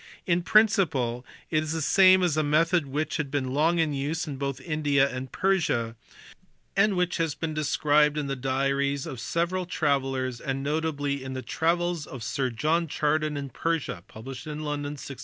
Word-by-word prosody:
In 175 0 +2
principle 170 - +3 0.3
it 155 - +3
is 155 0 -3
the 160 - -2
same 185 +2 +6
as 175 -4 +2
a 155 - +2
method 155 +2 +2
which 150 +3 -2
had 150 -3 -2
been 135 -2 -2
long 160 +4 +2
in 160 -3 +1
use 150 +5 -2
both 140 -2 -4
in - - -15
India 145 -3 +3
and 130 -1 -6
Persia, 140 -12 0 0.8
and 200 0 +3
which 180 -1 0
has 165 -3 -1
been 160 -1 -3
described 150 0 +2
in 150 - -1
the 140 0 -2
diaries 135 +1 0
of 135 -7 -6
several 175 +6 -1
travellers 135 -6 -1
and 135 0 -3
notably 145 -2 -1
in 130 0 -5
the 130 -1 -5
Travels 170 -1 0
of 130 - -8
Svr 125 +4 -1
John 165 +6 +1
Chardin 150 0 0
in 140 -1 -4
Persia, 145 - -2
London, 145 +4 -5
1686. 140 -1 -8
150 Hz, 175 wpm, -27 LUFS, 135-165 Hz, 0.8 s, same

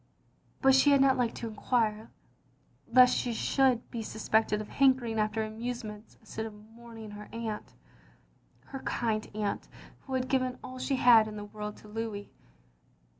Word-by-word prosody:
But 270 0 +6
she 265 +2 +5
had 280 -1 +5
not 270 -1 +5
liked 240 -2 0
to 230 - -5
enquire, 220 0 -1 0.8
lest 250 +1 +7
she 240 - -1
should 255 0 +2
be 235 - -4
suspected 220 0 0
of 215 - -6
hankering 255 -5 +2
after 215 +1 0
amusements 220 -1 -6
instead 220 0 -6
of 220 - -10
mourning 225 0 -12
her 205 0 -10
aunt; 225 -2 -5 0.9
her 270 - -7
kind 220 -4 -2
aunt 210 -1 -2 0.4
who 265 - -2
had 255 0 -1
given 255 -1 0
aU 255 0 -8
she 270 - 0
had 235 -4 +6
in 215 - -7
the 205 0 -6
world 210 0 -7
to - - -15
Louis. 210 -1 -5
225 Hz, 160 wpm, -30 LUFS, 215-255 Hz, 0.9 s, lest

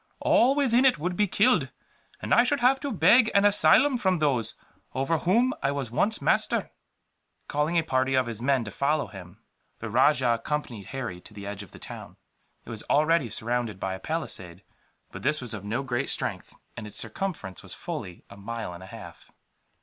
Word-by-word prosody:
All 260 +4 +4
within 260 -3 +3
it 265 -7 +5
would 175 +4 -2
be 210 +2 +2
killed, - - +3 0.5
and - - 0
I 240 - +6
should 280 +3 0
have 255 +2 +4
to 285 -1 -4
beg 235 -2 +5
an 200 0 +5
asylum 250 +6 +5
from 190 -5 +1
those 135 -8 0 0.4
over 135 +5 0
whom 235 - +2
I 140 - +1
was 140 -5 -4
once 210 - +1
master." - - +1 0.8
Calling 150 +4 0
a 165 - +3
party 130 -2 +1
of 130 -1 +3
his 115 -2 -5
men 130 -1 +2
to 100 - -7
follow 145 +6 0
him, 95 +2 -12 0.3
the 115 -2 -6
rajah 130 0 +4
accompanied 120 -10 -4
Harry 120 -10 -5
to 105 - -15
the 100 -1 -8
edge 100 0 -6
of 100 - -11
the - - -14
town. - - -10 0.5
It - - -9
was 110 -2 -5
already 155 -3 +3
surrounded 115 -2 -2
by 95 0 -2
a 95 - -6
palisade; 95 - -4 0.5
but - - -8
this 150 +3 +1
was 125 -4 -5
of 105 -3 -6
no 115 +6 -2
great 130 0 -2
strength, - - -2 0.2
and 105 - -7
its 105 0 -11
circumference 115 - -4
was - - -10
fully 90 -2 -7
a 100 - -13
mile 110 -1 -5
and 85 - -10
a 95 - -10
half. - - -12
135 Hz, 195 wpm, -26 LUFS, 110-175 Hz, 0.8 s, I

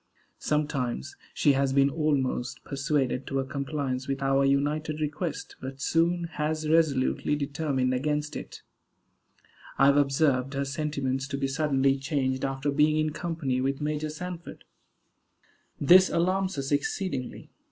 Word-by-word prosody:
Sometimes 140 - -1 0.2
she 145 - +3
has 135 0 +1
been 140 0 +4
almost 135 -4 -1
persuaded 140 -2 -1
to 135 - -1
a 135 - -1
compliance 135 -1 -3
with 135 0 -2
our 135 0 +3
united 150 +3 0
request, 155 +2 -4
but 135 +1 -7
soon 170 +4 +1
has 155 -1 -2
resolutely 150 -3 +2
determined 140 -3 -1
against 150 +3 -1
it. - - -8 1.1
I 135 - +5
have 140 +1 +5
observed 135 -2 +2
her 140 0 -1
sentiments 140 -2 -2
to 140 -1 -3
be 135 0 0
suddenly 135 -1 +1
changed 135 -2 -1
after 135 +1 -1
being 150 +2 +3
in 155 0 +1
company 150 -6 -2
with 135 +1 -1
Major 150 +1 -2
Sanford. 175 +2 -7 1.2
This 185 +6 +7
alarms 185 +1 0
us 135 0 -3
exceedingly. 145 -1 -2
140 Hz, 135 wpm, -27 LUFS, 135-155 Hz, 1.2 s, This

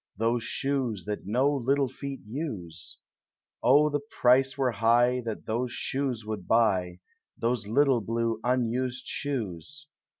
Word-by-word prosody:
Those 115 +2 +1
shoes 125 -7 -1
that 105 -2 -4
uo 130 +4 +1
little 140 +2 +2
feet 140 +1 -7
use. 105 - -6 0.6
O 145 +4 +5
the 145 - 0
price 135 -2 +2
were 130 -2 +2
high 120 +2 +3
That 115 -2 -5
those 120 +3 -1
shoes 130 -5 -2
would 105 -4 -5
buy, 95 -6 +2 0.4
Those 115 -2 -1
little 130 +1 +3
blue 115 +1 -1
unused 125 +1 0
shoes! 140 - -4
120 Hz, 130 wpm, -28 LUFS, 110-135 Hz, 0.6 s, O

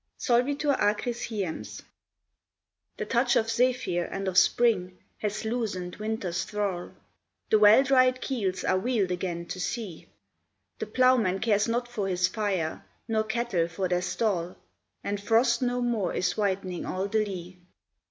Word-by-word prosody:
IV. - - -13
SOLVITUR 280 +3 +2
ACRIS 220 +3 0
HIEMS. 200 -8 -5 1.1
The - - -3
touch 245 0 +2
of 225 0 +2
Zephyr 240 -7 +1
and 195 0 -4
of 185 - -2
Spring 185 -4 +3 0.2
has 210 +1 -3
loosen'd 215 -6 -3
Winter's 210 -5 -2
thrall; 200 -4 -3 0.6
The 215 - +6
well 210 +5 +7
dried 255 -1 +4
keels 200 -10 -2
are 185 - +2
wheel'd 215 -4 0
again 175 -1 -3
to 185 - -6
sea: 195 -3 -4 0.7
The - - -3
ploughman 255 -7 +3
cares 210 0 +2
not 240 +1 -1
for 215 -5 -3
his 180 -1 +2
fire, 185 -5 -2 0.2
nor 220 -1 +1
cattle 220 -7 0
for 180 +3 -2
their 180 0 0
stall, 180 -1 -1 0.5
And 200 0 -3
frost 235 +4 +3
no 245 0 0
more 225 -7 -1
is 180 -1 0
whitening 190 -3 -1
all 190 +2 -2
the 215 +1 +1
lea. 180 -3 -7
210 Hz, 150 wpm, -27 LUFS, 185-235 Hz, 1.1 s, well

